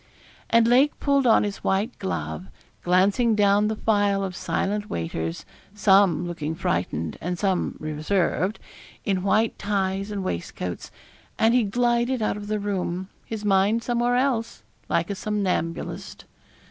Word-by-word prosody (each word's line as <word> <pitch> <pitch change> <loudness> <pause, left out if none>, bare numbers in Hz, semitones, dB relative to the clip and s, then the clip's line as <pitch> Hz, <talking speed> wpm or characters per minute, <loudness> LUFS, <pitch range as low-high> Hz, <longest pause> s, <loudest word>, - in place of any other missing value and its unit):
And 230 0 +5
Lake 260 +5 +4
pulled 280 -2 +2
on 225 - +5
his 205 -1 -3
white 205 +6 -1
glove, 80 -1 -4 0.3
glancing 200 +6 +3
down 205 0 +4
the 220 - -1
file 205 -2 +1
of 185 -2 -4
silent 205 +3 -2
waiters 80 0 -4 0.3
some 195 -4 +4
looking 160 -2 -4
frightened, 85 - -2
and 180 +1 -2
some 190 -1 0
reserved 170 +6 -1 0.5
in 195 -3 0
white 215 +4 +1
ties 195 -1 -1
and 205 -2 -3
waistcoats, 90 - -4 0.5
and 225 +1 +4
he 250 - +5
glided 240 +4 +1
out 215 - 0
of 205 0 -7
the 215 0 -1
room 190 -2 -3 0.2
his 215 -2 -5
mind 205 +3 +3
somewhere 240 0 +1
else 245 -3 0 0.3
like - - 0
a - - -2
somnambulist. 190 -5 -3
200 Hz, 140 wpm, -24 LUFS, 180-225 Hz, 0.5 s, And